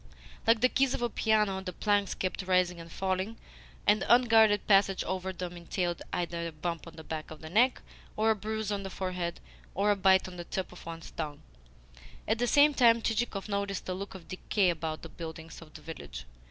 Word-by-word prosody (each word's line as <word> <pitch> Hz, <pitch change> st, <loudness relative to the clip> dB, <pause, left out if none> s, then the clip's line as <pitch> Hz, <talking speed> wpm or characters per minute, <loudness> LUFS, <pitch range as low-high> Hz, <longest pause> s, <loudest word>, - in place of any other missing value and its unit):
Like 225 Hz, -1 st, +5 dB
the 255 Hz, -, +6 dB
keys 270 Hz, -1 st, +2 dB
of 240 Hz, -, -3 dB
a 240 Hz, -, 0 dB
piano, 210 Hz, -4 st, +2 dB
the 185 Hz, -1 st, -6 dB
planks 205 Hz, 0 st, +1 dB
kept 185 Hz, +1 st, -2 dB
rising 180 Hz, -1 st, +1 dB
and 165 Hz, 0 st, -10 dB
falling, 190 Hz, +5 st, -2 dB, 0.5 s
and 210 Hz, -1 st, +4 dB
unguarded 225 Hz, -4 st, +5 dB
passage 195 Hz, -1 st, +4 dB
over 190 Hz, 0 st, -3 dB
them 180 Hz, -1 st, -6 dB
entailed 175 Hz, 0 st, -2 dB
either 170 Hz, -1 st, -2 dB
a -, -, -5 dB
bump 165 Hz, +2 st, -4 dB
on 165 Hz, -, -11 dB
the 160 Hz, -, -10 dB
back 155 Hz, 0 st, -5 dB
of 155 Hz, -, -10 dB
the 160 Hz, 0 st, -9 dB
neck 245 Hz, +7 st, +3 dB, 0.3 s
or 220 Hz, +1 st, +4 dB
a -, -, +2 dB
bruise 215 Hz, 0 st, -3 dB
on 200 Hz, -1 st, -1 dB
the 195 Hz, -, -5 dB
forehead 180 Hz, -2 st, -3 dB, 0.4 s
or 205 Hz, +2 st, +3 dB
a -, -, +3 dB
bite 190 Hz, -1 st, +4 dB
on 180 Hz, -1 st, -9 dB
the 175 Hz, -, -5 dB
tip 185 Hz, +2 st, -4 dB
of 180 Hz, -, -12 dB
one's 165 Hz, 0 st, -7 dB
tongue. 150 Hz, -3 st, -5 dB, 0.8 s
At 220 Hz, +1 st, +1 dB
the 245 Hz, -, +1 dB
same 290 Hz, +3 st, +6 dB
time 235 Hz, -3 st, +5 dB
Chichikov 220 Hz, -3 st, -1 dB
noticed 200 Hz, -1 st, -2 dB
a -, -, 0 dB
look 195 Hz, +1 st, -6 dB
of 180 Hz, -3 st, -11 dB
decay 185 Hz, 0 st, +1 dB
about 160 Hz, -1 st, -4 dB
the -, -, -6 dB
buildings 160 Hz, 0 st, -8 dB
of 160 Hz, -2 st, -13 dB
the -, -, -10 dB
village. 110 Hz, -, -8 dB
190 Hz, 210 wpm, -30 LUFS, 170-215 Hz, 0.8 s, the